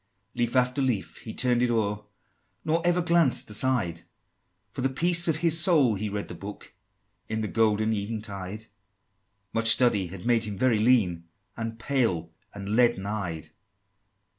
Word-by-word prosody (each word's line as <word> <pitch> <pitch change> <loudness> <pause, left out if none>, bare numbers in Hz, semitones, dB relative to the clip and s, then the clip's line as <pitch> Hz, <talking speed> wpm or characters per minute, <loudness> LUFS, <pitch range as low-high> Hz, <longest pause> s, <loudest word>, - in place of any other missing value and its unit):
V. - - -12
Leaf 120 +1 -1
after 125 +2 +2
leaf 125 -7 -2
he 110 - -9
turn'd 120 +1 +1
it 125 - +1
o'er, 105 -2 -1 0.6
Nor 160 +1 +1
ever 175 0 +1
glanced 170 -10 +2
aside, 105 -8 -1 0.7
For - - -6
the 135 - +1
peace 170 +5 +3
of 160 - +1
his 165 0 +6
soul 155 - +4
he 105 +1 -4
read 100 0 -4
that - - -10
book 100 +1 -10 0.6
In 110 0 -2
the 110 - -2
golden 110 0 +1
eventide: 105 -1 -6 0.9
Much 115 0 +3
study 115 -5 +4
had 90 +1 -10
made 120 -2 +2
him 105 -2 -6
very 120 -1 +2
lean, 105 -8 +2 0.3
And 115 0 -5
pale, 105 -10 -1 0.2
and 100 -1 -8
leaden 120 -5 +2
eyed. 100 -6 -5
115 Hz, 160 wpm, -26 LUFS, 100-130 Hz, 0.9 s, his